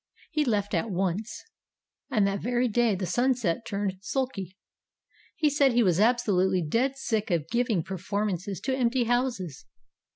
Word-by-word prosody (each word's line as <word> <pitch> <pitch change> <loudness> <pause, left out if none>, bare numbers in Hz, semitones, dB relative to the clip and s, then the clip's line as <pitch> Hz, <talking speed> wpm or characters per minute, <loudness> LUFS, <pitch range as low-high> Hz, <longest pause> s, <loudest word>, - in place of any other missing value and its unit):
He 305 -2 +1
left 210 -5 0
at 190 +6 0
once. 195 +3 -2 0.7
And 215 -7 +2
that 200 0 -1
very 245 +1 +1
day 235 -2 +2
the 185 0 -3
Sunset 235 -1 0
turned 200 -2 -2
sulky. 200 -6 -3 0.8
He 315 -3 +2
said 280 -3 +3
he 240 0 +4
was 180 -3 +2
absolutely 200 -6 +2
dead 260 - +1
sick 220 -5 -1
of 165 -4 0
giving 235 -7 +1
perform 200 +4 -2
ances 185 0 -4
to 265 - 0
empty 250 -1 +1
houses. 235 - -1
215 Hz, 155 wpm, -27 LUFS, 190-245 Hz, 0.8 s, he